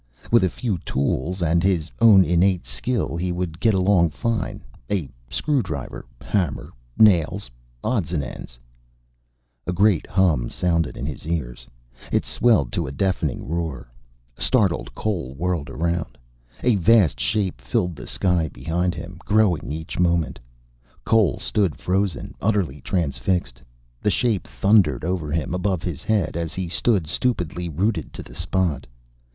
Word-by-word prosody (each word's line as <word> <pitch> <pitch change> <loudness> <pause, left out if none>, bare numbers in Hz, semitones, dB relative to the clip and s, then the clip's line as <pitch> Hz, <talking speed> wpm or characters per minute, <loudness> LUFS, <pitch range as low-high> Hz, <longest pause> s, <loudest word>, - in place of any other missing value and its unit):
With 115 -4 +6
a 95 - +3
few 105 -5 -2
tools 80 +7 -1
and 85 +1 +3
his 90 -4 +1
own 105 -5 +7
innate 90 +1 +2
skill 120 -9 -2
he 90 +1 -1
would 90 -2 -3
get 110 -1 +3
along 90 -3 +4
fine. 115 +8 -2 0.3
A 90 -8 -1 0.2
screwdriver, 85 - -2 0.2
hammer, 85 -10 -1 0.3
nails, 95 - +4 0.3
odds 100 -11 0
and 75 -5 0
ends - - -9 1.1
A - - +1
great 95 -1 +3
hum 85 -10 +2
sounded 85 -7 0
in 65 - -4
his 75 0 -6
ears. 65 -7 -3 0.4
It - - +1
swelled 110 - +2
to 85 -5 -2
a - - -5
deafening 85 -1 -1
roar. 80 -7 -4 0.4
Startled, 100 - +1
Cole 85 -12 -3
whirled 85 -1 -2
around. 85 -1 -2 0.5
A 120 -4 +4
vast 100 -3 +4
shape 95 - -1
filled 85 +7 -1
the - - -9
sky 90 -4 +1
behind 85 +7 -2
him, 90 +2 -8
growing 100 -7 +2
each 80 +2 -5
moment. 85 -5 +1 0.7
Cole 110 - +3
stood 100 -8 0
frozen, 95 -3 -1
utterly 95 -10 0
transfixed. 70 -5 -1 0.4
The - - +2
shape 105 -4 0
thundered 95 - +3
over 85 -4 -2
him, 80 +2 -1
above 90 -2 -1
his 85 -6 -4
head, 105 -9 0
as 85 -2 -3
he 95 -1 -2
stood 95 -1 +1
stupidly, 90 - -1
rooted 85 +1 -1
to - - -7
the - - -14
spot. 90 -6 -1
90 Hz, 145 wpm, -23 LUFS, 80-100 Hz, 1.1 s, own